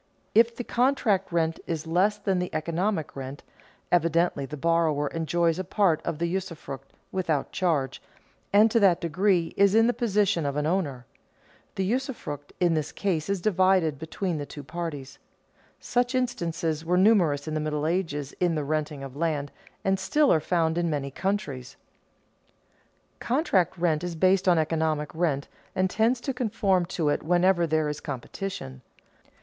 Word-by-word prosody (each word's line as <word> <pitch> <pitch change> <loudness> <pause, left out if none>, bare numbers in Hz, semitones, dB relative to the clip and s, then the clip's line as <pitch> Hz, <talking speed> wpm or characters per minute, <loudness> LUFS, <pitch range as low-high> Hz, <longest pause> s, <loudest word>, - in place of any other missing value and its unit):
If 230 +1 +4
the 245 - -4
contract 235 -7 +1
rent 165 -1 0
is 165 -2 -3
less 185 +6 +2
than 195 -3 0
the 180 - -2
economic 165 +2 -1
rent, 135 +1 -7 0.5
evidently 170 -4 +2
the 150 - -7
borrower 155 -1 +1
enjoys 165 +1 0
a - - -1
part 185 -3 +2
of 165 -3 -3
the 170 - -1
usufruct, 170 -7 -5 0.2
without 165 -7 -1
charge, 155 -8 0 0.5
and 210 +2 +5
to 230 - +4
that 190 -5 +4
degree 175 0 +1
is 200 +1 +4
in 225 0 +6
the 245 - +2
position 205 -8 +1
of 140 -1 -2
an 150 0 0
owner. 150 -8 -1 0.7
The 190 - -1
usufruct 225 - -3
in 175 -2 +3
this 155 -2 -1
case 180 -4 -2
is 200 -2 0
divided 185 -6 +2
between 160 +1 -3
the 145 - -4
two 145 - -9
parties. 145 -2 -6 0.6
Such 245 +1 0
instances 165 -10 -1
were 175 +2 +1
numerous 180 -8 +3
in 155 - -3
the 155 - 0
Middle 150 -1 -2
Ages 160 -5 -2
in 175 -2 +2
the 150 - -1
renting 150 -1 -2
of 135 -1 -8
land, 150 -3 -1 0.3
and 195 0 +2
still 300 -2 +3
are 160 - +3
found 165 +1 0
in 170 -1 0
many 140 -3 -2
countries. 140 -9 -3 1.4
Contract 235 - +1
rent 165 -2 +1
is 175 -1 -3
based 185 +3 +3
on 175 -2 +5
economic 155 -1 0
rent 160 -4 0 0.3
and 185 0 +1
tends 230 +3 +2
to 270 - -2
conform 205 -7 +1
to 165 -4 -1
it 145 - 0
whenever 175 +1 +3
there 155 -1 +1
is 150 0 -3
competition. 135 - -6
170 Hz, 165 wpm, -26 LUFS, 150-195 Hz, 1.4 s, in